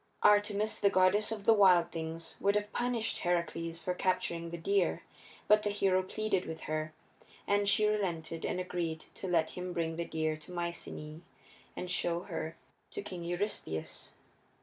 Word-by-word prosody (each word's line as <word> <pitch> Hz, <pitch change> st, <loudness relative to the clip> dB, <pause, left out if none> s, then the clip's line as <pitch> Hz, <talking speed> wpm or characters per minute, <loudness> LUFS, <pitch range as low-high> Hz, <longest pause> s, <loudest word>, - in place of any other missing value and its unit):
Artemis, 210 Hz, +1 st, +3 dB
the 200 Hz, -, +4 dB
goddess 195 Hz, +3 st, +3 dB
of 215 Hz, -2 st, -4 dB
the 225 Hz, -, +7 dB
wild 185 Hz, -5 st, +6 dB
things, 165 Hz, 0 st, -5 dB
would 200 Hz, +1 st, +2 dB
have 210 Hz, 0 st, -1 dB
punished 240 Hz, -2 st, 0 dB
Heracles 170 Hz, -1 st, -1 dB
for 180 Hz, -, 0 dB
capturing 175 Hz, -2 st, 0 dB
the 170 Hz, -, -5 dB
deer, 190 Hz, +2 st, +1 dB, 0.4 s
but 210 Hz, 0 st, +6 dB
the 210 Hz, -, 0 dB
hero 195 Hz, -2 st, +2 dB
pleaded 195 Hz, 0 st, -1 dB
with 160 Hz, 0 st, -6 dB
her, 155 Hz, 0 st, -2 dB, 0.5 s
and 200 Hz, 0 st, +2 dB
she 215 Hz, -, +5 dB
relented 170 Hz, -6 st, -1 dB
and 180 Hz, -, -1 dB
agreed 170 Hz, -3 st, -3 dB
to 190 Hz, -, -6 dB
let 165 Hz, -3 st, +2 dB
him 180 Hz, 0 st, -5 dB
bring 165 Hz, -1 st, -1 dB
the 170 Hz, -, -1 dB
deer 155 Hz, -1 st, -1 dB
to 155 Hz, +3 st, -12 dB
Mycenæ 170 Hz, -3 st, -4 dB, 0.6 s
and 180 Hz, -, -3 dB
show 170 Hz, -1 st, +1 dB
her 165 Hz, -3 st, -5 dB, 0.3 s
to -, -, -5 dB
King 180 Hz, -4 st, -6 dB
Eurystheus. 175 Hz, -, -3 dB
180 Hz, 165 wpm, -32 LUFS, 165-200 Hz, 0.6 s, the